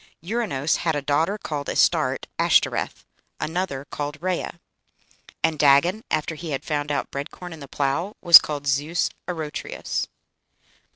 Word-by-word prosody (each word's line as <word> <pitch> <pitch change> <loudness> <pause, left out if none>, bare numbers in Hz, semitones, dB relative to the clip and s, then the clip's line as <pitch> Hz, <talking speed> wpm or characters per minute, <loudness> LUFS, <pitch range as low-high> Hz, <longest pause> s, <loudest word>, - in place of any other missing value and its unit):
Ouranos 175 - 0
had 165 -2 0
a 145 - -1
daughter 160 +8 +1
called 145 -8 -4
Astarte - - +2
(Ashtoreth), - - +2 0.3
another 155 -4 -3
called 145 +1 -4
Rhea. 180 0 -3 0.8
"And 160 -2 +1
Dagon, 150 +9 +4
after 155 +1 -1
he 160 +1 -7
had 135 -3 -3
found 150 -1 -2
out 145 - -2
bread 140 +2 -4
corn 180 -1 -9
and 160 - -11
the 140 - -8
plough, 145 +9 -1
was 170 -2 +10
called 145 -2 -5
Zeus 145 +5 0 0.2
Arotrius." 160 -4 -4
155 Hz, 140 wpm, -24 LUFS, 145-175 Hz, 0.8 s, was